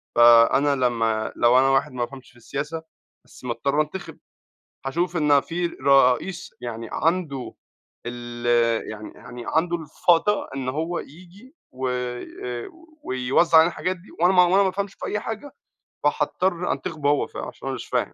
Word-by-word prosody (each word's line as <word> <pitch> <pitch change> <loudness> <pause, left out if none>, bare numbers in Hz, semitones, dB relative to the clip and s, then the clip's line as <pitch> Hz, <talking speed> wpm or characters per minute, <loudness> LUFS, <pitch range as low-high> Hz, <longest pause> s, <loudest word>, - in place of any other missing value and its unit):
فأنا 120 +4 +6
لمّا 115 -4 0
لو 120 +2 +5
أنا 135 - +4
واحد 135 +2 +2
ما 120 -1 -1
بافهمش 130 0 -13
في 120 - -22
السياسة، 150 +7 -5 0.4
بس - - -17
مضطر 140 +5 0
أنتِخب. 155 +5 -6 0.7
هاشوف 175 +5 -1
إن 150 -3 +4
في 175 +3 -2
رئيس 140 +3 +2
يعني 115 -1 -6
عنده 160 -6 -1 0.5
ال 120 0 -6 0.4
يعني 110 0 -8
يعني 120 -1 -10
عنده 175 +2 +1
الفَضَى 165 +5 +1
إن 130 -1 -3
هو 160 +5 -2
ييجي 185 - -13 0.2
وآآ 125 -1 -4 0.3
ويوزّع 130 +6 +3
علينا 165 +2 +6
الحاجات 185 +1 -2
دي، 180 - -18
وأنا 180 +2 +5
ما 180 - +7
وأنا 190 +3 +4
ما 190 - +2
أفهمش 200 +1 -3
في - - -7
أي 210 - -2
حاجة، 225 +6 -6 0.5
فحاضطر 180 +4 0
أنتخبه 155 -5 -2
هو. 145 - +2
ف - - -12
عشان - - -7
أنا - - -2
مش - - -8
فاهم - - -1
145 Hz, 155 wpm, -24 LUFS, 125-175 Hz, 0.7 s, ما